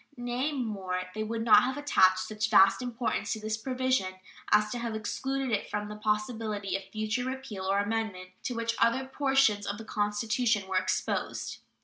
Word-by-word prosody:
Nay, 245 +4 -1
more, 195 -9 -2
they 215 - -4
would 225 +1 -2
not 210 -2 +8
have 260 +4 -1
attached 190 -9 +4
such 220 0 -2
vast 195 -1 +6
importance 240 -3 -2
to 220 - -5
this 215 0 -2
provision 255 -5 0 0.4
as 210 0 +4
to 245 - -3
have 235 -2 -3
excluded 265 +5 -2
it 205 - -1
from 210 0 -3
the 210 - -6
possibility 210 -1 -1
of 195 - -4
future 215 +3 -2
repeal 260 -7 -5
or 195 +1 +2
amendment, 205 -3 -2
to 245 - -2
which 230 0 -1
other 250 +3 +3
portions 265 -6 +2
of 200 - -2
the 225 - -9
Constitution 210 0 0
were 190 -1 0
exposed. 185 - -2
220 Hz, 175 wpm, -29 LUFS, 205-245 Hz, 0.4 s, not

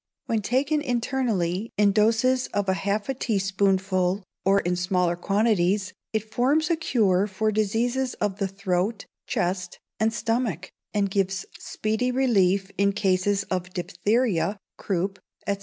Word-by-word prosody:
When 225 -2 0
taken 275 +8 +1
internally, 230 - -1
in 205 -1 +5
doses 230 +5 +2
of 205 -1 0
half 200 +2 0
a 270 - 0
teaspoonful, 195 -4 0 0.2
or 195 +1 +4
in 180 +1 0
smaller 180 -1 +1
quantities, 195 0 +1 0.2
it 220 0 -3
forms 295 +8 +2
a - - +4
cure 210 - +2
for 215 +2 0
diseases 235 +5 0
of 205 -2 -2
the 195 - +1
throat, 195 +2 -2 0.2
chest, 180 0 -2 0.2
and 220 +1 +2
stomach, 220 -4 -2 0.2
and 200 -2 0
gives 195 -1 0
speedy 220 +4 -1
relief 200 -7 +2
in 200 0 +3
cases 195 0 +1
of 180 -1 -3
diphtheria, 205 +2 0 0.2
croup, 195 +1 -2 0.3
&c. 200 0 +1
200 Hz, 135 wpm, -25 LUFS, 190-225 Hz, 0.3 s, in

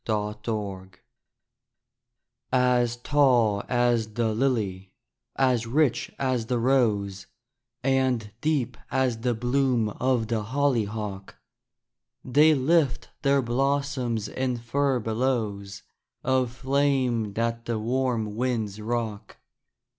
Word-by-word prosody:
THE 110 - +1 0.2
GLADIOLES 100 -4 -5 1.6
As 125 -2 +2
tall 120 -6 +3
as 120 -3 +1
the 115 -2 +1
lily, 105 -7 -1 0.4
as 125 -4 +2
rich 125 -1 +1
as 130 -4 -1
the 125 - 0
rose, 110 -6 +1 0.6
And 130 -5 +1
deep 135 -6 0
as 130 -4 0
the 120 +1 0
bloom 125 -1 +1
of 125 +1 0
the 115 -1 -1
hollyhock, 110 -6 -2 0.9
They 150 +4 +5
lift 140 -1 +1
their 140 -1 +3
blossoms 130 -3 -1
in 130 +1 -2
furbelows 115 -5 -1 0.4
Of 130 -2 +1
flame 130 -4 0
that 115 +1 -2
the 115 -1 -1
warm 115 -2 -1
winds 110 -4 -2
rock. 110 -2 -4
120 Hz, 100 wpm, -26 LUFS, 110-130 Hz, 1.6 s, They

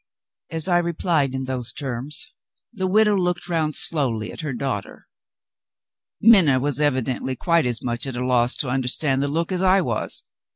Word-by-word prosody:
As 160 0 -2
I 175 -1 +3
replied 165 -5 0
in 130 - -3
those 125 -3 -2
terms 140 - -3 0.4
the 190 -2 -2
widow 210 +2 +3
looked 180 -2 -1
round 160 -3 -1
slowly 125 -9 0
at - - -11
her 155 -3 -3
daughter. 120 -6 -5 1.1
Minna 185 - +6
was 145 +1 -2
evidently 130 -2 -1
quite 170 -1 +1
as 120 -2 -3
much 120 +1 -3
at 130 - -5
a 125 +1 -2
loss 125 -1 +2
to 135 - +1
understand 130 +2 0
the 140 - 0
look 165 +5 -2
as 185 -1 -1
I 190 +1 +4
was. 120 -9 -1
145 Hz, 170 wpm, -22 LUFS, 125-170 Hz, 1.1 s, Minna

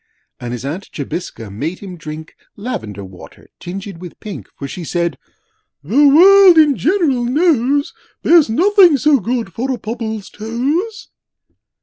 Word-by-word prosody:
And 120 -1 -6
his 125 +1 -6
Aunt 170 +8 -6
Jobiska 140 - -6
made 150 - -4
him 190 -3 -9
drink, 155 -1 -9 0.2
Lavender 110 - -6
water 95 -1 -15
tinged 190 0 -7
with 180 -2 -10
pink, 210 -3 -8
For 140 - -6
she 175 +5 -7
said, 170 -1 -2 0.7
'The 260 - +4
World 370 +4 +7
in 300 -3 +5
general 310 -7 +1
knows 285 0 +1 0.3
There's 330 -7 +5
nothing 360 - +5
so 290 0 +3
good 230 -3 -3
for 250 +7 -3
a 255 - -2
Pobble's 220 -3 -6
toes!' 290 - -3
225 Hz, 140 wpm, -17 LUFS, -, 0.7 s, World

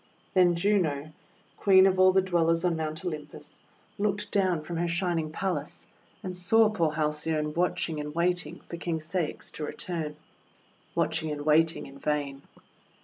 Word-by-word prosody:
Then 180 -2 +5
Juno, 170 -6 +1 0.5
Queen 190 -1 +6
of 190 -1 +2
all 185 0 +7
the 190 0 +3
Dwellers 165 -2 +2
on 175 -2 +2
Mount 160 +2 -4
Olympus, 155 -4 -7 0.4
looked 205 0 -1
down 185 -6 +1
from 170 +2 -5
her 175 +1 0
Shining 170 -2 -1
Palace, 155 -4 -3 0.4
and 185 -1 -4
saw 215 +5 +4
poor 170 -7 +1
Halcyone 150 0 -1
watching 170 -2 0
and 150 +1 -6
waiting 175 -1 0
for 170 - -6
King 170 -1 -2
Ceyx 160 +1 -3
to 155 - -6
return, 155 -1 -4 0.4
— - - -35
watching 160 0 0
and 145 -1 -4
waiting 160 +1 +3
in 135 0 -12
vain. 140 -2 -2
165 Hz, 155 wpm, -28 LUFS, 155-180 Hz, 0.5 s, all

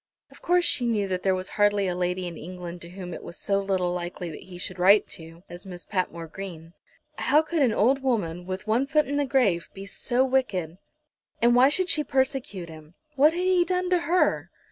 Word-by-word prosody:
Of - - -17
course 355 0 +2
she 250 -4 +1
knew 210 -4 0
that 185 -1 -2
there 190 0 +2
was 185 0 -5
hardly 205 -1 +2
a 180 - -1
lady 180 +1 -2
in 175 -1 -6
England 175 +1 -8
to 170 - -9
whom 180 -1 -8
it - - -7
was 170 - -8
so 200 -1 0
little 190 -3 0
likely 175 -1 -5
that 150 - -10
he 185 -1 -10
should 180 +1 -5
write 195 +1 +4 0.3
as 175 0 -10
to 195 - -10
Miss 180 -1 -5
Patmore 180 -3 -3
Green. 165 -2 -9 0.5
How 300 +2 +3
could 320 0 -1
an 255 -4 +4
old 255 +6 +2
woman, 180 -9 -1
with 185 0 -5
one 230 +5 +1
foot 300 0 +2
in 285 +1 -2
the 290 - +1
grave, 240 -11 +1
be 195 0 -8
so 245 +5 0
wicked? 195 -11 -1 0.6
And 240 +1 +4
why 250 +2 +6
should 365 +5 0
she 305 - +1
persecute 260 -9 -1
him? 160 0 -13 0.2
What 295 +4 +5
had 355 +1 -2
he 370 -1 +4
done 365 0 -1
to 360 - +4
her? 340 +3 +1
200 Hz, 220 wpm, -26 LUFS, 180-270 Hz, 0.6 s, why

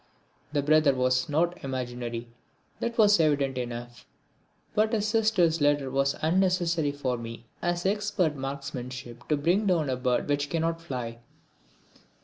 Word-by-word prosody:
The 145 -2 0
brother 150 -2 +4
was 130 +1 +1
not 170 +4 0
imaginary, 120 -3 -4 0.5
that 235 0 -3
was 210 -4 +6
evident 145 -4 +2
enough. 120 0 -6 0.7
But 215 +2 +2
his 215 -1 +1
sister's 210 -8 +2
letter 145 -2 +2
was 135 +1 +1
as - - -15
unnecessary 170 -3 +2
for 130 -4 -2
me 115 0 -8 0.2
as 175 0 -1
expert 200 -5 +1
marksmanship 130 -3 -6
to 150 - +2
bring 180 +8 +2
down 160 -7 +2
a - - +1
bird 125 -1 0
which 145 0 0
cannot 165 +1 -1
fly. 125 -7 -5
145 Hz, 140 wpm, -27 LUFS, 130-175 Hz, 0.7 s, was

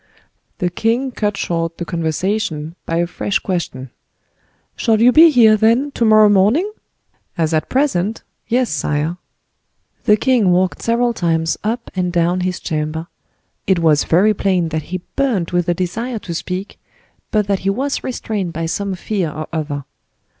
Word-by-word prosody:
The 180 0 -1
king 235 +8 0
cut 210 -4 -2
short 165 -2 -2
the 175 - -4
conversation 165 -1 -2
by 165 - -1
a 170 - +2
fresh 190 +3 -1
question. 135 -9 -4 0.8
"Shall 225 -2 +1
you 240 +2 +6
be 325 +5 +8
here, 230 -7 +6
then, 230 +7 +2
to 240 - -2
morrow 215 -1 +6
morning?" 205 - +3 0.7
"As 165 -1 0
at 155 - 0
present? 225 -7 0 0.2
yes, 245 +1 +1
sire." 150 +2 -1 0.9
The 210 - +5
king 240 -5 +2
walked 180 +1 +1
several 235 +1 +1
times 165 -4 0
up 230 +3 -3
and 180 -1 0
down 175 +1 +1
his 180 0 -2
chamber; 160 +1 -3 0.6
it 190 - +3
was 160 -3 +3
very 195 +6 +4
plain 185 -4 0
that 155 -1 -3
he 185 0 -4
burned 225 -12 0
with 175 0 0
a 175 - +2
desire 225 +8 -3
to 185 -4 -6
speak, 180 +4 -5 0.5
but 210 -1 +1
that 200 -1 0
he 195 - -1
was 270 +8 -1
restrained 210 -8 -3
by 165 +1 -3
some 195 +3 -2
fear 185 -2 -2
or 155 +1 -6
other. 145 -3 -3
185 Hz, 160 wpm, -18 LUFS, 165-220 Hz, 0.9 s, be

